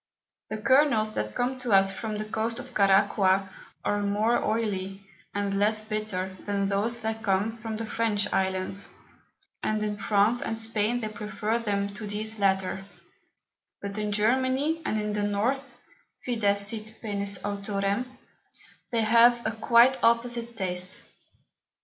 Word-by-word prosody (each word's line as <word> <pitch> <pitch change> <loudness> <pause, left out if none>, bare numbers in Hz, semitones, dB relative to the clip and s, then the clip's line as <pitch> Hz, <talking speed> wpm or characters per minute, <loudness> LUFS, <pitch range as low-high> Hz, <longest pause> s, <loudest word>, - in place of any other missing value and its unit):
The 215 - -3
Kernels 230 -2 +3
that 105 - -3
come 255 +1 -1
to 245 -4 -1
us 195 0 +6
from 215 +2 -4
the 215 - -3
Coast 225 +2 -2
of 250 0 -8
Caraqua, 195 -1 +3 0.4
are 205 0 +1
more 210 +4 +1
oily, 195 -3 -2 0.3
and 200 -1 -1
less 215 +1 +2
bitter, 215 -4 -3
than 200 -1 0
those 210 +4 -1
that 220 0 -3
come 215 +2 0
from 220 -1 -4
the 225 - -4
French 220 -3 0
Islands, 190 +1 0 0.7
and 215 0 0
in 210 -1 -2
France 210 +4 +3
and 225 - -3
Spain 225 +1 -1
they 215 - -2
prefer 215 +1 -2
them 200 -3 -1
to 210 +1 -7
these 215 +1 -4
latter: 190 -1 +1 1.0
But 200 0 -5
in 210 0 -1
Germany, 260 +9 +1
and 215 - 0
in 210 0 -2
the 210 - -1
North 240 +6 -1 0.5
(Fides 205 -5 +2
sit 220 +1 -3
penes 200 -2 -2
Autorem) 200 +2 -1 0.9
they 230 -2 +1
have 235 +2 +5
a 220 - +1
quite 235 +4 +4
opposite 235 0 +2
Taste. 185 -1 -2
215 Hz, 145 wpm, -27 LUFS, 200-230 Hz, 1.0 s, us